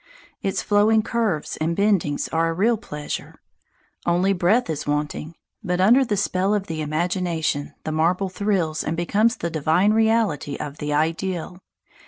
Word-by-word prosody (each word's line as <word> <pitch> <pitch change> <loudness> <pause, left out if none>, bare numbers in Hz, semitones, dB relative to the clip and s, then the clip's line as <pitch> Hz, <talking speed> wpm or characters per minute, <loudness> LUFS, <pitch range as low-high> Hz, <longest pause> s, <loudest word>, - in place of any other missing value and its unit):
Its 195 - -1
flowing 215 +1 +3
curves 220 -10 -1
and 165 +2 -1
bendings 195 -8 +1
are 165 0 +2
a - - -1
real 225 +7 +3
pleasure; 150 -9 -6 0.7
only 180 +3 +3
breath 195 +7 +2
is 155 -3 -4
wanting; 150 +2 -2 0.3
but 180 0 -1
under 235 +8 +5
the 210 -5 -1
spell 195 +1 +1
of 200 -2 -2
the 160 -3 -4
imagination 160 -1 -1
the 155 - -3
marble 170 +5 +1
thrills 185 -5 -1
and 165 +2 -2
becomes 215 +7 +2
the 170 - -3
divine 160 +7 +2
reality 220 -11 +1
of 145 0 -7
the 150 -1 -3
ideal. 165 +4 -1
180 Hz, 155 wpm, -23 LUFS, 155-205 Hz, 0.7 s, under